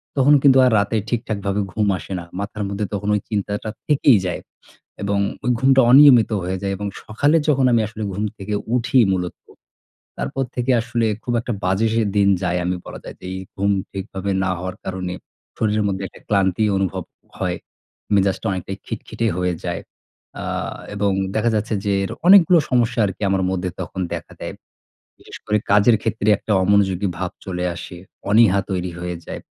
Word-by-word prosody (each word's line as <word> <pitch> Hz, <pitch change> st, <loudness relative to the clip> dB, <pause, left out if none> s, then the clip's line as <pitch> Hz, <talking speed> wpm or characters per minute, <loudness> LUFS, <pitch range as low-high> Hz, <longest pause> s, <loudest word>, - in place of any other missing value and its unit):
তখন 145 Hz, +1 st, +5 dB
কিন্তু 135 Hz, -1 st, +6 dB
আর 125 Hz, -, +4 dB
রাতে 100 Hz, +2 st, 0 dB
ঠিকঠাকভাবে 105 Hz, -3 st, -2 dB
ঘুম 105 Hz, -2 st, +1 dB
আসে 80 Hz, +4 st, -7 dB
না। -, -, -7 dB, 0.2 s
মাথার 105 Hz, +1 st, -4 dB
মধ্যে 100 Hz, +1 st, -2 dB
তখন 100 Hz, +1 st, -2 dB
ওই 105 Hz, -, -1 dB
চিন্তাটা 105 Hz, 0 st, -2 dB, 0.2 s
থেকেই 140 Hz, -6 st, +5 dB
যায়। 90 Hz, -, -3 dB, 0.6 s
এবং 100 Hz, 0 st, 0 dB, 0.2 s
ওই 125 Hz, -, +1 dB
ঘুমটা 135 Hz, 0 st, +5 dB
অনিয়মিত 130 Hz, -5 st, +8 dB
হয়ে 95 Hz, +1 st, -2 dB
যায় 100 Hz, 0 st, -1 dB
এবং 105 Hz, +1 st, -4 dB, 0.2 s
সকালে 145 Hz, +9 st, +2 dB
যখন 135 Hz, -3 st, +3 dB
আমি 115 Hz, -1 st, +4 dB
আসলে 110 Hz, -1 st, -7 dB
ঘুম 105 Hz, +3 st, -2 dB
থেকে 100 Hz, +2 st, -5 dB, 0.2 s
উঠি 125 Hz, +2 st, +1 dB, 0.2 s
মূলত। 90 Hz, -1 st, -3 dB, 0.8 s
তারপর 65 Hz, -, -2 dB
থেকে 125 Hz, +1 st, 0 dB
আসলে 120 Hz, -1 st, -1 dB, 0.2 s
খুব 120 Hz, -, -2 dB
একটা 120 Hz, -, -3 dB
বাজে 95 Hz, +5 st, +2 dB
সে 115 Hz, -, +2 dB
দিন 100 Hz, -1 st, +4 dB
যায়। 90 Hz, 0 st, 0 dB
আমি 90 Hz, +1 st, 0 dB
বলা -, -, -8 dB
যায় -, -, -9 dB
যে -, -, -12 dB
এই 95 Hz, -, -4 dB, 0.2 s
ঘুম 100 Hz, +1 st, +2 dB, 0.2 s
ঠিকভাবে 95 Hz, 0 st, -4 dB
না 95 Hz, -, 0 dB
হওয়ার 95 Hz, 0 st, -5 dB
কারণে 90 Hz, -1 st, -4 dB, 0.4 s
শরীরের 105 Hz, -1 st, +1 dB
মধ্যে 95 Hz, 0 st, -2 dB
একটা -, -, -16 dB
ক্লান্তি 100 Hz, 0 st, +2 dB
অনুভব 95 Hz, -2 st, -1 dB, 0.3 s
হয়। -, -, -2 dB, 0.6 s
মেজাজটা 100 Hz, +2 st, +1 dB
অনেকটাই 95 Hz, +1 st, -4 dB
খিটখিটে 115 Hz, 0 st, -3 dB
হয়ে 90 Hz, 0 st, 0 dB
যায়। 85 Hz, -2 st, -3 dB, 0.6 s
আ -, -, -5 dB, 0.5 s
এবং 100 Hz, -1 st, +1 dB, 0.2 s
দেখা 115 Hz, +2 st, +2 dB
যাচ্ছে 110 Hz, +1 st, -1 dB
যে 100 Hz, -, +1 dB
এর 95 Hz, -, -4 dB, 0.2 s
অনেকগুলা 180 Hz, -3 st, +7 dB
সমস্যা 120 Hz, -1 st, +2 dB
আরকি 95 Hz, 0 st, -5 dB
আমার 95 Hz, -1 st, +1 dB
মধ্যে 90 Hz, -1 st, -2 dB
তখন 95 Hz, -, -5 dB
দেখা -, -, -6 dB
দেয়। -, -, -5 dB, 0.7 s
বিশেষ -, -, -12 dB
করে 105 Hz, 0 st, +2 dB
কাজের 105 Hz, +3 st, +5 dB
ক্ষেত্রে 110 Hz, -1 st, -1 dB
একটা 110 Hz, -, -3 dB
অমনোযোগী 100 Hz, -1 st, +2 dB
ভাব 95 Hz, -1 st, -2 dB
চলে 90 Hz, -1 st, -3 dB
আসে। 85 Hz, +1 st, -8 dB, 0.3 s
অনীহা 105 Hz, -3 st, +5 dB
তৈরি 90 Hz, -1 st, -2 dB
হয়ে 90 Hz, 0 st, -4 dB
যায়। -, -, -6 dB
100 Hz, 175 wpm, -21 LUFS, 95-115 Hz, 0.8 s, অনিয়মিত